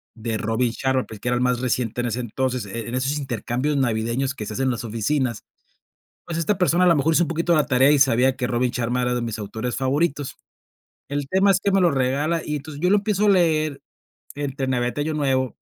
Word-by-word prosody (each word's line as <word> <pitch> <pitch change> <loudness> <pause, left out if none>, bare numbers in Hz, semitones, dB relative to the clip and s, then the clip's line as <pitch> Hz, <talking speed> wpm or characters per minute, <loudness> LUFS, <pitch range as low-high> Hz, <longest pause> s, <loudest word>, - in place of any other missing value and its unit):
de 115 -1 -3
Robin 115 +2 0
Sharma, 130 +1 0
pues, 110 - -10
que 120 - -3
era 125 - +1
el 125 - 0
más 125 -1 +1
reciente 120 -2 -1
en 120 - -1
ese 120 +1 -2
entonces, 125 0 -2
en 115 +3 -5
en 125 - -4
esos 135 +3 0
intercambios 130 +2 -2
navideños 120 +2 0
que 110 - -6
se 105 - -6
hacen 135 +4 -1
en 130 - +2
las 120 - -4
oficinas, 120 +2 -1 0.9
pues, 170 -1 -3
esta 165 +5 +1
persona 180 0 +3
a - - +5
lo 170 - +5
mejor 150 +3 +2
hizo 175 - +4
un - - -6
poquito 165 +1 +1
la 150 -2 +2
tarea 130 +2 +4
y 150 - +4
sabía 130 -1 +4
que 125 - -1
Robin 125 +1 0
Sharma 125 +1 -1
era 125 0 0
de 125 - -1
mis 115 -2 -4
autores 110 +4 -4
favoritos. 140 +2 -1 0.7
El 145 -1 -2
tema 190 +1 +3
es 190 - +4
que 200 - 0
me 195 - +4
lo 175 -2 +4
regala, 140 +5 0
y 150 - -2
entonces, 145 +1 -8
yo 180 - +2
lo 205 - +6
empiezo 205 0 0
a 205 - +6
leer 155 -6 +2 0.6
entre 140 -2 -3
Navidad 125 -1 0
y - - 0
Año 155 +2 -1
Nuevo, 130 -4 0
130 Hz, 240 wpm, -23 LUFS, 120-150 Hz, 0.9 s, lo